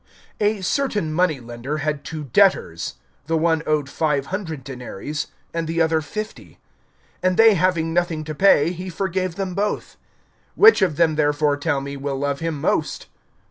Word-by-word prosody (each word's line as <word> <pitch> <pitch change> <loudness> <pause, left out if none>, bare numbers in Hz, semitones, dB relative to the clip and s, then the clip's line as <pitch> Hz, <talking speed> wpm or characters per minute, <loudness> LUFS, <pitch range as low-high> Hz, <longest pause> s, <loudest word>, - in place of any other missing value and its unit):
(41)A 210 -2 +1
certain 205 - 0
money 165 -4 +1
lender 120 +5 -5
had 150 -1 -2
two 155 -2 -6
debtors. 140 - +2 0.3
The 165 0 +1
one 160 0 +2
owed 150 -2 +1
five 145 -1 0
hundred 160 -9 -4
denaries[7:41], 135 +2 -5 0.3
and 165 -1 -2
the 165 +1 -2
other 160 -1 +2
fifty. 215 +7 -7 0.7
(42)And 185 0 +2
they 225 -1 +7
having 170 -3 +1
nothing 170 -2 0
to 155 0 -5
pay, 165 -2 +4
he 180 +1 -6
forgave 185 0 -2
them 190 -1 -3
both. 205 +3 -2 0.6
Which 440 +2 +7
of 180 -6 +2
them 160 -1 +2
therefore, 145 -1 +2
tell 145 -1 -1
me, 140 0 -6
will 140 0 -3
love 140 0 -1
him 165 -3 -3
most? - - -1
160 Hz, 165 wpm, -22 LUFS, 145-185 Hz, 0.7 s, they